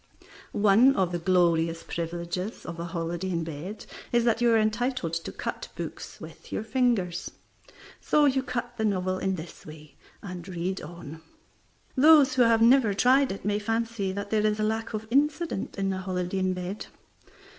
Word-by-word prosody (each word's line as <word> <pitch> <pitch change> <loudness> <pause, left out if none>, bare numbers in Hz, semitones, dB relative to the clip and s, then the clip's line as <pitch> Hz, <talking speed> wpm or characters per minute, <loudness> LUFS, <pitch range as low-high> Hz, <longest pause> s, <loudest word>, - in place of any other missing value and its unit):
One 215 +7 +5
of 185 -2 +1
the 175 - -2
glorious 165 -2 +2
privileges 170 +4 -4
of 170 0 -7
a 170 - -3
holiday 170 +2 -3
in 170 -2 -1
bed 165 +6 -7 0.3
is 240 -1 +3
that 230 0 +2
you 240 - +4
are 225 - +5
entitled 220 -4 0
to 165 0 -3
cut - - -5
books - - -7
with - - -12
your - - -2
fingers. 220 -7 0 0.7
So 300 -1 +3
you 265 -1 +3
cut 240 -2 -4
the 220 - -1
novel 185 -2 0
in 190 0 0
this 165 -1 -9
way, 155 -1 -13 0.3
and 180 -3 -7
read 185 +1 -3
on. 160 -1 -9 0.7
Those 295 0 +6
who 255 - +2
have 230 -1 +5
never 230 -4 +5
tried 260 +5 +4
it 195 - -7
may 205 0 +1
fancy 225 -2 -1
that 200 +1 -5
there 215 -1 +2
is 210 0 -1
a - - +1
lack 220 +1 -2
of 215 +1 -4
incident 295 - 0
in 195 -1 0
a 190 - -3
holiday 185 0 -2
in 185 0 +1
bed. 180 +3 -5
195 Hz, 175 wpm, -27 LUFS, 175-230 Hz, 0.7 s, Those